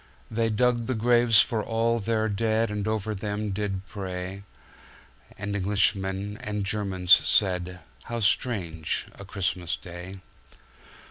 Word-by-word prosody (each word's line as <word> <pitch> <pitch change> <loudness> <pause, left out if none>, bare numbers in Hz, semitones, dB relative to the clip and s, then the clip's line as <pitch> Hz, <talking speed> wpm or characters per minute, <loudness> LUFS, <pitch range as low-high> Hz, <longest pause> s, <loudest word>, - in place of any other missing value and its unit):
They 115 0 +1
dug 120 +1 +1
the 130 - 0
graves 120 -1 +5
for 110 -2 -2
all 115 +1 +1
their 110 +1 0
deadAnd 110 0 0
over 110 0 -1
them 105 +1 -3
did 95 -1 -3
pray:And 95 +2 -9
Englishmen 100 0 0
and 105 -1 -3
Germans 95 -3 -2
said:"How 90 - +3
strange 95 -7 0
a - - -11
Christmas 90 -3 -2
Day!" 90 +2 -9
105 Hz, 110 wpm, -26 LUFS, 95-110 Hz, -, graves